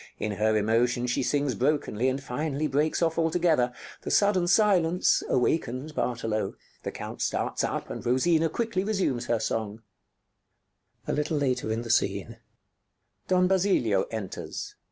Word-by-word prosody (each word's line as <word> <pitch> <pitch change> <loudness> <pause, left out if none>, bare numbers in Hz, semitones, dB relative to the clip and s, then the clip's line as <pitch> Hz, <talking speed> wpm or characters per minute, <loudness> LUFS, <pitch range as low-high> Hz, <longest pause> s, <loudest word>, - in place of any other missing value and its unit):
In 105 - -2
her 110 +2 +1
emotion 120 +3 +1
she 120 - 0
sings 140 0 0
brokenly, 130 -1 0
and 130 +1 -2
finally 145 +3 -2
breaks 150 +4 +1
off 165 0 +1
altogether. 160 -6 +2 0.3
The - - -5
sudden 200 -4 +3
silence 180 -3 +3
awakens 130 +2 0
Bartolo. 115 -7 -2 0.3
The - - -4
Count - - -7
starts - - -1
up, - - -3
and - - -6
Rosina 160 +7 +2
quickly 225 -1 -1
resumes 185 - -1
her 120 - +2
song_.] 110 0 -3 1.3
_[Don 120 - -2
Basilio 180 - +2
enters. 110 -5 -6
130 Hz, 115 wpm, -27 LUFS, 115-165 Hz, 1.3 s, sudden